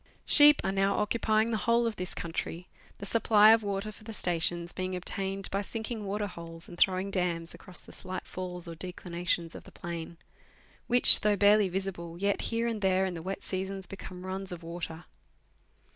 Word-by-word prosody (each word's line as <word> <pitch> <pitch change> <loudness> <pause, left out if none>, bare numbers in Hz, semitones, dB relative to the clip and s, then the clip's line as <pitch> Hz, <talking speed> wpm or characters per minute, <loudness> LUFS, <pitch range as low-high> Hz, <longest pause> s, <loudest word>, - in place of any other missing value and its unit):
Sheep 295 0 +7
are 190 - +1
now 195 0 +1
occupying 215 +1 +1
the 220 - 0
whole 235 0 +4
of 225 -2 -2
this 180 0 -3
country, 170 +1 -5 0.3
the 200 - -7
supply 215 0 +5
of 225 0 +5
water 200 +1 -3
for 215 - -15
the 225 0 -8
stations 175 -2 -1
being 185 0 -3
obtained 195 +2 -2
by 195 - 0
sinking 220 +1 -5
waterholes 175 -5 -4
and - - -10
throwing 190 +2 +2
dams 175 -3 -1
across 180 - -11
the - - -14
slight 185 0 -7
falls 180 -1 -6
or 170 - -6
declinations 175 -1 -3
of - - -10
the - - -15
plain, 170 -1 -7 0.7
which, 245 +1 +8
though 210 -1 +2
barely 205 0 +4
visible, 175 -3 -4
yet 200 +2 0
here 230 0 -1
and 230 -3 -2
there 190 -1 +2
in 185 - -3
the 165 - -6
wet 190 +3 -5
seasons 190 0 -3
become 185 -1 -9
runs 190 0 -4
of 175 -1 -7
water. 165 0 -7
190 Hz, 185 wpm, -29 LUFS, 175-210 Hz, 0.7 s, which